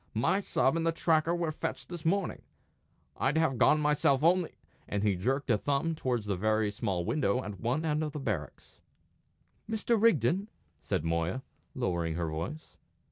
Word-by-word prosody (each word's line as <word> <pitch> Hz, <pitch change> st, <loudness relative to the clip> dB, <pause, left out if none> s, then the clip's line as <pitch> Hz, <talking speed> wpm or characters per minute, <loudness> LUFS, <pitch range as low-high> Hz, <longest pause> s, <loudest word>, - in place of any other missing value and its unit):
My 185 Hz, -, +2 dB
sub 135 Hz, -6 st, +1 dB
and 165 Hz, -, 0 dB
the 165 Hz, -, +2 dB
tracker 165 Hz, 0 st, +2 dB
were 170 Hz, -2 st, -1 dB
fetched 155 Hz, -, -4 dB
this 175 Hz, -3 st, -7 dB
morning. 195 Hz, +2 st, 0 dB, 0.8 s
I'd 140 Hz, +4 st, +1 dB
have 140 Hz, -7 st, +1 dB
gone 150 Hz, -, +5 dB
myself 150 Hz, -2 st, +2 dB
only 175 Hz, +1 st, +3 dB, 0.2 s
" -, -, -35 dB
and 100 Hz, 0 st, -1 dB
he 105 Hz, -2 st, +3 dB
jerked 130 Hz, +8 st, 0 dB
a 105 Hz, -, +3 dB
thumb 145 Hz, +6 st, 0 dB
towards 125 Hz, -8 st, -2 dB
a 100 Hz, -, 0 dB
very 110 Hz, +2 st, +1 dB
small 95 Hz, -4 st, -2 dB
window 125 Hz, -, +1 dB
at 105 Hz, -2 st, -7 dB
one 130 Hz, +8 st, -1 dB
end 150 Hz, -1 st, +1 dB
of 150 Hz, -2 st, -4 dB
the 150 Hz, -, -4 dB
barracks. 105 Hz, -, -5 dB, 0.9 s
"Mr. 225 Hz, 0 st, +1 dB
Rigden?" 185 Hz, -, +3 dB, 0.3 s
said -, -, -1 dB
Moya, 85 Hz, +9 st, -1 dB, 0.3 s
lowering 85 Hz, -3 st, -1 dB
her 85 Hz, -1 st, -1 dB
voice. 85 Hz, -, -6 dB
135 Hz, 175 wpm, -30 LUFS, 105-160 Hz, 0.9 s, gone